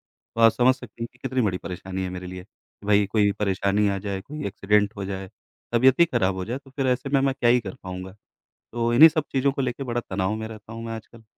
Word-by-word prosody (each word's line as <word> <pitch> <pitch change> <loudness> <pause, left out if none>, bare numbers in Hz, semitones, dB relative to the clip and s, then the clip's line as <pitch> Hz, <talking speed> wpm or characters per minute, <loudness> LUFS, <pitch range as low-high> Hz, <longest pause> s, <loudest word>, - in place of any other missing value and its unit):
तो 115 - -7
आप 115 0 +8
समझ 125 +3 +4
सकती 115 -2 -9
हैं - - -3
कि 120 - -26
कितनी 130 0 0
बड़ी 100 -5 0
परेशानी 95 +1 -5
है 90 - -3
मेरे 90 0 -6
लिए, 90 0 -8
कि 100 0 -19
भई 105 0 +4
कोई 105 -1 +3
परेशानी 100 +1 +1
आ 100 - -1
जाए, 100 -1 -4
कोई 150 +9 -7
एक्सीडेंट 105 +1 +1
हो 100 - -4
जाए, 95 -1 -5 0.4
तबीयत 130 +4 +5
ही 170 - +8
ख़राब 105 - 0
हो 95 -1 -4
जाए 120 +3 -3
तो 135 -1 -17
फ़िर 135 -1 -1
ऐसे 125 +2 0
में 140 - +3
मैं 135 0 +2
क्या 120 - +4
ही 125 +1 +5
कर 95 -4 -7
पाऊँगा, 95 0 -6 0.6
तो 120 0 0
इन्हीं 160 +7 +10
सब 155 -1 -1
चीज़ों 135 +1 +2
को 135 - -3
लेके 130 +1 -2
बड़ा 120 -2 -2
तनाव 95 +2 -1
में 110 0 -5
रहता 110 0 -11
हूँ 115 0 -7
मैं 115 - -4
आजकल। 115 +1 -11
110 Hz, 260 wpm, -24 LUFS, 95-125 Hz, 0.6 s, इन्हीं